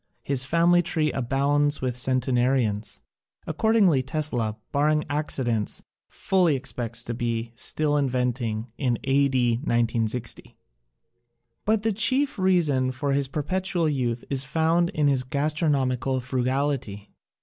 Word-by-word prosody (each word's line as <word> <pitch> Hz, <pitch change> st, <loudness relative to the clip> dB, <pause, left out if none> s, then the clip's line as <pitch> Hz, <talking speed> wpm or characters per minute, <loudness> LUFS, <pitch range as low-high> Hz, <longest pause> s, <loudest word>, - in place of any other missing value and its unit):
His 135 Hz, -2 st, -1 dB
family 170 Hz, +4 st, +3 dB
tree 155 Hz, -3 st, 0 dB
abounds 140 Hz, +3 st, +1 dB
with 125 Hz, -2 st, -2 dB
centenarians. 125 Hz, -4 st, 0 dB, 0.4 s
Accordingly, 210 Hz, -11 st, +3 dB
Tesla 130 Hz, -6 st, -2 dB
— -, -, -50 dB
barring 150 Hz, +1 st, +1 dB
accidents— 130 Hz, -7 st, -2 dB, 0.3 s
fully 180 Hz, -6 st, +1 dB
expects 120 Hz, -3 st, -3 dB
to 120 Hz, -, -3 dB
be 115 Hz, -1 st, -3 dB
still 150 Hz, +5 st, 0 dB
inventing 125 Hz, -4 st, -1 dB
in 125 Hz, -4 st, 0 dB
A. 140 Hz, +1 st, +3 dB
D. 120 Hz, -3 st, +1 dB
1960. 115 Hz, -2 st, -1 dB, 1.1 s
But 215 Hz, 0 st, +1 dB
the 225 Hz, -1 st, +1 dB
chief 260 Hz, +4 st, +2 dB
reason 160 Hz, -9 st, +2 dB
for 135 Hz, +2 st, -2 dB
his 140 Hz, -1 st, +1 dB
perpetual 175 Hz, +4 st, -1 dB
youth 125 Hz, -5 st, -2 dB
is 135 Hz, -1 st, +2 dB
found 165 Hz, +5 st, +1 dB
in 150 Hz, -4 st, 0 dB
his 135 Hz, -2 st, +2 dB
gastronomical 135 Hz, -2 st, 0 dB
frugal 130 Hz, +3 st, 0 dB
ity. 105 Hz, -7 st, -6 dB
135 Hz, 125 wpm, -25 LUFS, 120-155 Hz, 1.1 s, family